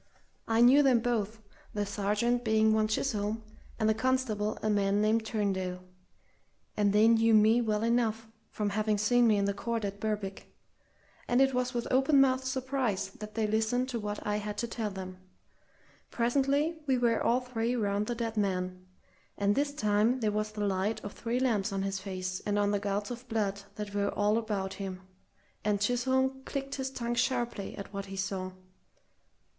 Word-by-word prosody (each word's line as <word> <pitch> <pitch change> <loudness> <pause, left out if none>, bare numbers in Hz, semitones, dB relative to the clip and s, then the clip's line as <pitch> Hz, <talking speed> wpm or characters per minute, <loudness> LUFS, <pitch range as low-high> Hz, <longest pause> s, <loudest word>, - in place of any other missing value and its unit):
I 225 0 +3
knew 255 +4 +7
them 260 -4 +4
both, 225 -2 -1 0.3
the 205 -1 0
sergeant 210 +5 0
being 220 -1 +3
one 215 0 +2
Chisholm, 215 -1 -1 0.3
and 220 - +1
the 220 - +4
constable 220 -3 0
a - - +1
man 200 -1 +2
named 215 +1 +2
Turndale, 190 -5 -2 0.9
and 205 -1 +2
they 210 +2 +5
knew 225 -1 +5
me 220 +3 +5
well 215 -2 0
enough 225 -1 +1 0.2
from 210 -1 -2
having 215 +1 +1
seen 240 +3 +4
me 215 -2 +4
in 200 - +1
the 200 - 0
court 225 +1 -2
at 200 0 -5
Berwick; 205 -3 -4 0.8
and 245 +1 +2
it 270 0 +4
was 250 0 -1
with 235 - -1
open 270 +2 +4
mouthed 260 -1 +3
surprise 260 -7 -1
that 210 0 -8
they 220 -1 +1
listened 220 +4 0
to 240 -2 -2
what 210 -1 -5
I 210 0 0
had 210 0 -5
to 235 - -1
tell 225 -2 -3
them. 185 -1 -8 0.9
Presently 280 +6 +1
we 260 -1 +3
were 235 -1 +2
all 240 +2 +3
three 245 -1 -2
round 205 -2 0
the 240 - -2
dead 230 -1 -3
man, 185 -2 -2 0.5
and 200 0 +2
this 285 +4 0
time 215 -1 +2
there 215 -3 +1
was 215 +1 -2
the 210 -1 -2
light 195 +2 0
of 205 - -6
three 240 +2 -2
lamps 220 -6 +1
on 195 0 -1
his 195 0 -2
face 185 -1 -4
and 205 0 -1
on 205 0 +2
the 205 - +1
gouts 205 +2 -2
of 245 +1 -7
blood 200 -3 -1
that 210 -1 -6
were 200 0 +1
all 210 +2 +1
about 200 -4 -3
him, 190 -2 -6 0.6
and 205 -1 +1
Chisholm 260 +4 +1
clicked 275 0 -4
his 265 -1 -2
tongue 240 -2 -3
sharply 240 -4 -1
at 200 0 -8
what 200 0 -5
he 195 - -7
saw. 190 -1 -3
215 Hz, 185 wpm, -30 LUFS, 205-240 Hz, 0.9 s, knew